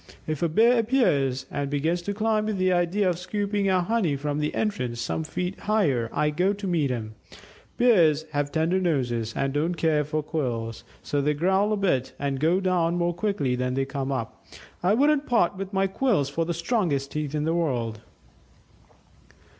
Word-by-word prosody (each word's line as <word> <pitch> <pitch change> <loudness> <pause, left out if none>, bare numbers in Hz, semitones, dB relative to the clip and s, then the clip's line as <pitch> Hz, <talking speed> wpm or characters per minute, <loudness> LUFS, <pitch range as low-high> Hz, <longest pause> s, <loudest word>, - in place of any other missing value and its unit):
If 155 -2 -3
a 170 - +2
Bear 230 +8 +4
appears 145 - +1
and 145 -1 -2
begins 160 +5 0
to 205 +4 -3
climb 215 0 +1
with 215 -2 -1
the 185 0 +2
idea 180 +3 +1
of 175 -1 0
scooping 205 +1 -1
out 185 -2 +2
honey 200 -8 +1
from 145 +1 -2
the 150 0 -1
entrance 125 - -2
some 160 - -2
feet 180 +4 -4
higher, 150 - +1
I 150 - +1
go 180 +6 +1
to 205 0 -7
meet 165 -7 +1
him; 110 -3 -4 0.6
Bears 170 -11 +4
have 145 -1 -1
tender 165 +4 +1
noses, 120 -9 0
and 135 0 -1
don't 160 +4 0
care 155 -2 +2
for 155 +1 -2
quills. 120 -8 -3 0.2
So 145 - -1
they 150 +1 +1
growl 190 +6 +2
a 215 - +1
bit 155 -11 0
and 140 -1 -2
go 165 +5 +3
down 180 -3 +1
more 175 0 0
quickly 170 -9 -1
than 125 0 -1
they 135 0 0
came 140 0 -3
up... 120 -5 -4 0.4
I 185 +4 +3
wouldn't 290 +3 +2
part 205 -6 +2
with 195 0 -6
my 195 -1 +1
quills 195 - +1
for 165 +4 -1
the 170 - -2
strongest 170 - -1
teeth 150 -1 -3
in 150 - 0
the 160 +1 0
world." 120 -10 -1
165 Hz, 190 wpm, -25 LUFS, 140-195 Hz, 0.6 s, Bear